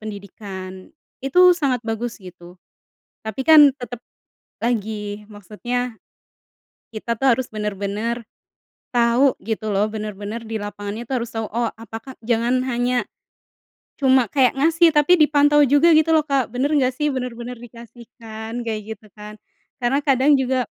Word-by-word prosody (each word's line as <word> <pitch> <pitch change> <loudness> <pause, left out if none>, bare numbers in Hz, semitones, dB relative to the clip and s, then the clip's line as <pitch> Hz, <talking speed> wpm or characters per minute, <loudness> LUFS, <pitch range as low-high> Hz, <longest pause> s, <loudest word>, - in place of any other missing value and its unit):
pendidikan. 195 - -9 0.3
Itu 360 +6 +6
sangat 270 -6 0
bagus 225 +1 -3
gitu. 180 -1 -13 0.7
Tapi, 220 +4 -4
kan, 305 -3 +8
tetep 245 -2 -8 0.6
lagi 210 -3 -3
maksudnya 235 +4 -4 1.0
kita, 230 +1 -3
tuh, 265 +4 +1
harus 260 -1 -4
bener-bener 210 +3 -3 0.7
tahu 240 +3 +3
gitu, 220 0 -4
loh, 205 +1 +2
bener 215 0 -5
bener 215 +3 -6
di 225 0 -4
lapangan 205 +1 -6
itu 240 - -8
harus 235 -2 -3
tahu, 225 -1 -4
oh, 230 +2 -1
apakah 225 +3 -9
jangan 240 +2 +1
hanya 245 0 0 0.9
cuma 260 -2 +4
kayak 260 +3 +2
ngasih 330 +4 +4
tapi 305 +4 +4
dipantau 295 0 +4
juga 290 +5 +5
gitu, 320 +1 +4
loh, 310 - +2
Kak, 275 -4 0
bener 255 +6 -1
nggak, 260 -4 +2
sih? 295 +1 0
Bener-bener 250 -1 -5
dikasihkan 235 -1 -9
kayak 220 -2 -3 0.2
gitu, 215 - -21
kan, 210 0 -11 0.5
karena 270 +4 +2
kadang 275 0 +3
juga 255 -1 0
235 Hz, 140 wpm, -21 LUFS, 215-265 Hz, 1.0 s, kan